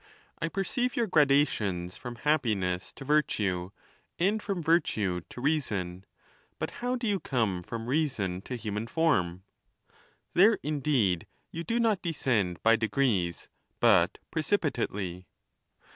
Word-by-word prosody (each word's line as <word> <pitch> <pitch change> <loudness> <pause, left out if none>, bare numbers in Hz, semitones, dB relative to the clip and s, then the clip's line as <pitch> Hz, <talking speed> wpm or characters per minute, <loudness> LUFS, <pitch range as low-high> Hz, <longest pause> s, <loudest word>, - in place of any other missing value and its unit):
I 170 - +1
per 195 +4 -2
ceive 250 +4 -1
your 235 - +2
gradations 135 - +2
from 120 -1 -7
happiness 110 -11 0
to 135 - -10
virtue, 100 -11 +1 0.5
and 205 +5 +1
from 195 -5 -3
virtue 110 - +1
to 125 - -9
reason; 100 - -1 0.5
but - - -3
how 250 +1 0
do 245 -1 -4
you 205 -3 +1
come 110 - 0
from 115 +5 -6
reason 120 - 0
to 125 - -2
human 110 -1 -4
form? 95 - +1 0.9
There, 210 +5 +6
indeed, 135 - +1 0.2
you 165 - -4
do 230 +6 0
not 220 -5 +2
descend 115 - 0
by 115 0 +6
de 110 - 0
grees, 100 -11 0 0.3
but - - +4
precipitately. 90 -3 -1
125 Hz, 130 wpm, -29 LUFS, -, 0.9 s, There